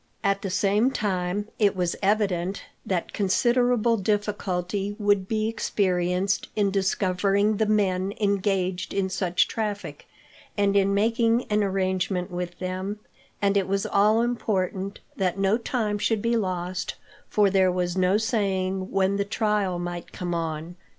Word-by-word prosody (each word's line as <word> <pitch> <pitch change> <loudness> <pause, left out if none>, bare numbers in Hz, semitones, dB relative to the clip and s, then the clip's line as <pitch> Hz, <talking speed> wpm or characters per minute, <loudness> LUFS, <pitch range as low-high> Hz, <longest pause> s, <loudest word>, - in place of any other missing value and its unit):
At 195 -1 +1
the 195 - -3
same 205 +6 +2
time, 200 -3 -1
it 205 -2 +3
was 180 -2 0
evident 195 -2 0 0.2
that 180 -3 -2
considerable 240 +3 +2
difficulty 205 -1 -1
would 205 -3 +2
be 215 0 0
experienced 185 -3 0
in 205 -2 +2
discovering 195 +1 +1
the 220 - +1
men 195 -3 +1
engaged 195 -3 0
in 195 -1 0
such 180 -1 +1
traffic, 210 -2 -4 0.5
and 200 -1 +2
in 200 0 +3
making 230 +3 +2
an 210 0 +3
arrangement 185 -1 -1
with 175 0 -4
them, 185 +3 -4 0.5
and 200 0 +3
it 195 -2 +2
was 195 0 0
all 210 +3 +3
important 200 -5 -1 0.2
that 185 -1 0
no 195 +1 +3
time 225 -3 -1
should 220 0 0
be 235 0 +2
lost, 185 -3 -2 0.3
for 205 -2 +3
there 190 -1 +4
was 180 -1 -1
no 185 +1 +3
saying 195 -4 -1
when 195 0 +1
the 200 - +1
trial 210 -3 0
might 175 0 -5
come 175 -1 -4
on. 165 +1 -4
195 Hz, 145 wpm, -25 LUFS, 185-210 Hz, 0.5 s, there